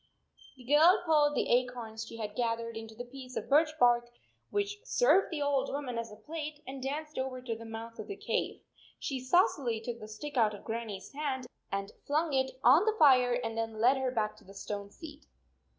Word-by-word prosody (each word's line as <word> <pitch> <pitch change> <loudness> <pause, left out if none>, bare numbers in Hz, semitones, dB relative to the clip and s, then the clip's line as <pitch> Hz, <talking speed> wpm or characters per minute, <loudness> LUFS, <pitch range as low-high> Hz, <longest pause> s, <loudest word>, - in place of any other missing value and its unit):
The 255 - -13
girl 310 - +6
poured 295 -2 +4
the - - +1
acorns 240 -3 -1
she 230 - -9
had 210 -2 -5
gath 230 -1 +1
ered 230 0 -6
into 225 0 -8
the 245 +2 -6
piece 255 0 -10
of - - -4
birch 305 +3 +5
bark 240 -3 +4 0.4
\vhich 410 0 -1
served - - +4
the 300 -4 -2
old 275 -2 +1
woman 265 -4 -3
as 230 -1 -5
a - - -9
plate, 300 +6 -7
and 265 0 -7
danced 300 +3 -4
over 260 -1 -3
to 245 -2 -4
the 230 +1 -10
mouth 225 +1 -8
of - - -6
the 400 - -5
cave. - - -2 0.4
She 270 -2 -3
saucily 255 - +2
took 235 +1 -5
the 215 - -8
stick 275 +7 -7
out 215 -3 +3
of - - -13
Grannie 225 -3 -4
s 190 - -13
hand 275 -3 -2 0.3
and 195 0 -3 0.2
flung 305 +1 +1
it 265 -1 0
on 280 - +7
the 440 -1 +2
fire, 255 - +6
and 225 -1 -3
then 225 -1 -3
led 250 +4 +5
her 265 -1 0
back 220 -4 -1
to - - -18
the 195 +1 -14
stone 200 0 -5
seat. 305 +5 -12
255 Hz, 215 wpm, -31 LUFS, 225-295 Hz, 0.4 s, on